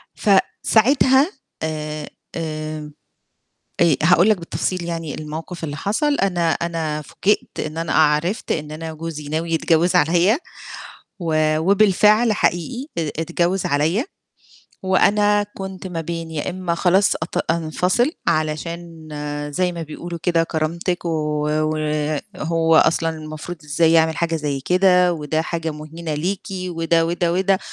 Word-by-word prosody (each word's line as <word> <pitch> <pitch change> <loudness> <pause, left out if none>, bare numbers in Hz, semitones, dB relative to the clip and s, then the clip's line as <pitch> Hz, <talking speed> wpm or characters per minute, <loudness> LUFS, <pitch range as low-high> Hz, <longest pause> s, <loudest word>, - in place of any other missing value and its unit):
فساعتها 260 - +3 0.3
آآ 155 -1 -4 0.3
آآ 155 -2 -5 0.9
آآ 165 -5 +5
هاقول 175 +5 +5
لك 210 - +4
بالتفصيل 175 +1 -3
يعني 165 -3 -4
الموقف 160 +3 -7
اللي 145 -2 -3
حصَل؛ 265 +9 0
أنا 175 -4 +1
أنا 160 -3 -2
فوجئت 195 +8 -1
إن 155 +1 -4
أنا 165 -1 -2
أ - - +1
عرِفت 155 +8 +2
إن 150 -1 -2
أنا 160 +1 -6
جوزي 155 -2 -6
ناوي 160 +2 -2
يتجوز 165 +2 +2
عليَّ 175 - +4 0.8
و 155 -2 +1
وبالفعل 210 +4 +4
حقيقي 240 - -1
ا 160 -2 0
اتجوز 175 +3 0
عليَّ، 160 - +1 0.8
وأنا 205 +2 +3
كنت 190 0 -6
ما 165 -2 -4
بين 165 0 -5
يا 155 +2 -3
إمّا 180 -2 -2
خلاص 190 +3 +3
أط 160 - -2
أنفصِل 180 - +1 0.2
علشان 160 +1 -2 0.4
زي 180 +1 +1
ما 170 -1 -6
بيقولوا 170 +2 -7
كده 170 -2 +3
كرامتِك 170 +3 -2
و - - 0 1.3
وهو 165 0 +1
أصلًا 165 0 +4
المفروض 155 +2 -7
إزاي 160 +2 +2
يعمل 160 -1 +3
حاجة 165 -1 0
زي 145 -3 -2
كده 180 +1 +4
وده 155 0 -1
حاجة 165 -1 -3
مهينة 155 +1 -6
ليكِ 180 +6 -2
وده، 165 -3 0
وده، 170 0 0
وده 190 +1 +2
165 Hz, 130 wpm, -21 LUFS, 155-185 Hz, 1.3 s, آآ